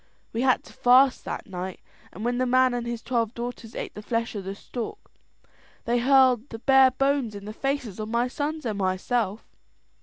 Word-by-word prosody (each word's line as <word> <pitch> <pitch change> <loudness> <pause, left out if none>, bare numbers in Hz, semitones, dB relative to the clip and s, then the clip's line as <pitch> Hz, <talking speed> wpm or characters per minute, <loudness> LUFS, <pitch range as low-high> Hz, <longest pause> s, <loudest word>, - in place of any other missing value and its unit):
We 230 - -1
had 255 -1 +3
to - - -15
fast 255 +2 +4
that - - -5
night; 185 -3 -6 0.3
and 210 +6 -7
when 245 +1 0
the 255 - +1
man 255 0 +4
and 240 -1 -3
his 235 -1 -4
twelve 235 -2 -1
daughters 235 -1 -6
ate - - -5
the 210 - -8
flesh 230 +2 -2
of 200 -3 -5
the 195 +1 -4
stork, 240 - -6 0.9
they 240 +1 +2
hurled 260 0 +4
the 225 - -6
bare 265 +2 +6
bones 270 -4 0
in 200 0 -8
the 215 - -6
faces 270 -5 -3
of 215 0 -4
my 235 +2 +1
sons 295 +3 -3
and 215 -3 -2
myself. 195 +3 -1
240 Hz, 195 wpm, -26 LUFS, 215-255 Hz, 0.9 s, bare